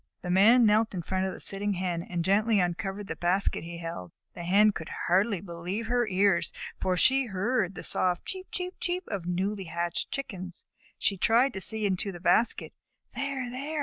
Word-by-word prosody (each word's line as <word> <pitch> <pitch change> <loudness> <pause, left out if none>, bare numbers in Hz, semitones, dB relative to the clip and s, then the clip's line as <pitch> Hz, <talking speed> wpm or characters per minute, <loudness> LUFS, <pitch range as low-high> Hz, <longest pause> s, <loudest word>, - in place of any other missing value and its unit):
The 180 - -2
Man 225 +6 +6
knelt 215 0 +3
in 175 - -3
front 190 +3 -1
of - - -3
the - - -9
sitting 200 +1 +1
Hen, 180 -2 -2
and 170 -1 -4
gently 210 +2 +3
uncovered 195 +3 -2
the - - -5
basket 180 +1 0
he 170 +1 -7
held. 165 - -6 0.2
The 175 - -8
Hen 205 +5 +5
could 160 -4 -7 0.2
hardly 195 +2 +2
believe 180 +4 -5
her 240 0 +1
ears, 195 -2 +2 0.3
for 185 -1 0
she 265 +8 +3
heard 195 -1 -1
the - - -7
soft 180 -1 +1
"cheep 375 0 -7
cheep 360 0 -4
cheep" 360 +1 -2
of 190 -4 -4
newly 190 +2 -2
hatched 170 +1 -3
Chickens. 185 -10 -6 0.3
She 195 - 0
tried 235 +7 +3
to 190 - -4
see 220 +2 +4
into 195 +1 -1
the 175 - -9
basket. 225 +6 +2 0.4
"There! 275 -2 -3
There!" 285 +5 -4
195 Hz, 190 wpm, -28 LUFS, 180-225 Hz, 0.4 s, Man